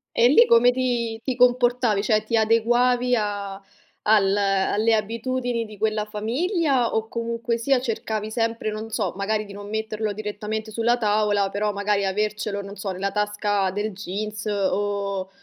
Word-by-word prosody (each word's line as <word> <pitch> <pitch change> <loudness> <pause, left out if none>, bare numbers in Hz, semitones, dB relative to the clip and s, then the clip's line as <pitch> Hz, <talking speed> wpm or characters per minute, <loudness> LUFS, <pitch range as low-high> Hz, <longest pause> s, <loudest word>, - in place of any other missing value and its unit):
E 235 - +5
lì 470 - +7
come 240 +2 +6
ti 240 -3 -1
ti 260 - -2
comportavi? 245 -3 +3
Cioè, 215 -2 +2
ti 230 - -1
adeguavi 240 +3 +3
a 200 -2 -3 0.5
al 200 -2 +4
alle 200 +3 +2
abitudini 230 +2 -2
di 215 -1 -12
quella 215 0 0
famiglia, 255 - 0
o 220 0 0
comunque 235 0 -2
sia 255 +2 +2
cercavi 220 -3 -3
sempre, 230 -1 -1
non 215 +1 -6
so, 210 -5 -1
magari 215 +2 -1
di 200 - -12
non 205 0 -9
metterlo 220 0 -2
direttamente 215 +1 -5
sulla 235 +2 +1
tavola, 210 -3 +1
però 205 +1 -1
magari 200 0 0
avercelo, 210 +1 -2
non 200 0 -9
so, 195 -1 -3
nella 195 +2 -2
tasca 210 -1 0
del 205 +2 -2
jeans, 210 +2 -5
o 200 -1 -1
215 Hz, 155 wpm, -23 LUFS, 205-230 Hz, 0.5 s, lì